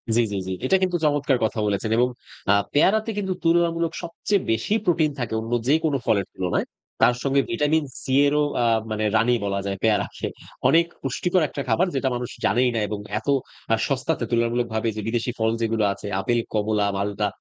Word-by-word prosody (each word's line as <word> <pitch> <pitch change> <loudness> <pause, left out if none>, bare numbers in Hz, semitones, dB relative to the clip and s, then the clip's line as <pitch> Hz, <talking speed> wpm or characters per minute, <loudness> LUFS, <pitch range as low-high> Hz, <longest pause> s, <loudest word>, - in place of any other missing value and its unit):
জ্বি, 120 - +4
জ্বি, 100 - -2
জ্বি। 95 - -2
এটা 190 - +3
কিন্তু 180 -1 +1
চমৎকার 145 -3 +2
কথা 110 - -2
বলেছেন 105 +2 -1
এবং 125 +1 +4 0.4
আ - - +6 0.2
পেয়ারাতে 215 +9 +3
কিন্তু 190 -2 -1
তুলনামূলক 165 0 +2
সবচেয়ে 175 +3 -1
বেশি 115 - 0
প্রোটিন 160 -3 +2
থাকে 120 -3 -3
অন্য 115 +1 -7 0.2
যে, 145 - +5
কোন 150 - +1
ফলের 100 -3 +2
তুলনায় 90 -2 -1 0.4
তার 120 +1 +5
সঙ্গে 140 0 +3
ভিটামিন 155 -1 +2 0.2
সি 130 - -3
এরও 150 +1 +2 0.2
আ - - +2 0.3
মানে 110 0 -1
রানি 120 +2 +3
বলা 100 0 -1
যায় 100 0 -2
পেয়ারাকে। 110 -2 0 0.4
অনেক 165 +4 +5 0.2
পুষ্টিকর 175 +7 0
একটা 140 - -5
খাবার 185 +2 +3
যেটা 130 0 +1
মানুষ 120 0 -4 0.2
জানেই 125 +1 +3
না 115 - +1
এবং 105 - -4 0.2
এত 110 - -18 0.5
আ - - +6
সস্তাতে 140 +4 -1
তুলনামূলকভাবে 115 -1 0
যে, 110 - -3
বিদেশী 120 +1 -1
ফল 110 0 +2
যেগুলো 115 -1 +1
আছে 100 - -9
আপেল, 120 +4 +1
কমলা, 105 -1 +1
মাল্টা 100 +1 -1
125 Hz, 185 wpm, -23 LUFS, 110-160 Hz, 0.5 s, আ